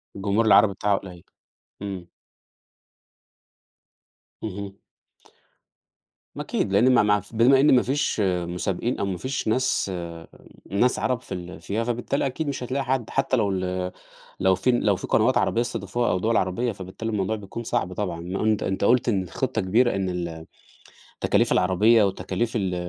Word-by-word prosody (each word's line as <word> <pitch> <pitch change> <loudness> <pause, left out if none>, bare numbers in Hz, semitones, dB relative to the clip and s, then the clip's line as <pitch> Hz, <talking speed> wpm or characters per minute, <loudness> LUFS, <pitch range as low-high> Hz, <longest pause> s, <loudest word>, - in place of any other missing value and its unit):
الجمهور 100 +3 0
العربي 110 -2 +6
بتاعها 100 +1 +1
قليّل، 90 -3 -10 0.6
إمم. 95 -4 -6 2.3
اهم. 100 -2 -6 1.6
ما - - -4
أكيد - - -2
لإن 125 +6 +5
ما 120 - +5
ما 105 0 +3
ف 110 - -13
بما 125 +4 +5
إن 140 0 +6
ما 125 - +5
فيش 135 -3 0
مسابقين، 90 +5 -2
أو 100 - 0
ما 95 -2 -3
فيش 130 +6 -3
ناس 110 -3 +1 0.8
ناس 120 +6 +2
عرب 125 -2 -1
في - - -8
ال 90 0 -7
فيها، 110 +3 -2
فبالتالي 120 +4 -1
أكيد 140 +4 -3
مش 140 -3 -3
هتلاقي 130 +3 -2
حد، 130 -3 -1
حتّى 135 -1 0
لو 105 -3 +1
ال 90 -1 -2 0.5
لو 95 0 +3
في 125 - +1
لو 110 -4 +2
في - - -6
قنوات 120 +4 +3
عربية 115 - +1
استضافوها 120 0 -1
أو 90 - 0
دوَل 110 +4 +1
عربية، 95 +6 0
فبالتالي 95 +3 -6
الموضوع 105 +1 -1
بيكون 105 +2 -7
صعب 90 -4 -1
طبعًا، 90 -3 -3
ما 90 +4 -3
أنت 110 -1 +1
أنت 95 - -2
قُلت 120 +4 +3
إن 100 -4 +1
الخطة 90 - -2
كبيرة 115 +6 +2
إن 95 -1 -1
ال 85 -2 -5 0.8
تكاليف - - +2
العربية 105 +5 +4
وتكاليف 100 +3 -1
ال 95 -5 -1
105 Hz, 165 wpm, -24 LUFS, 95-120 Hz, 2.3 s, العربي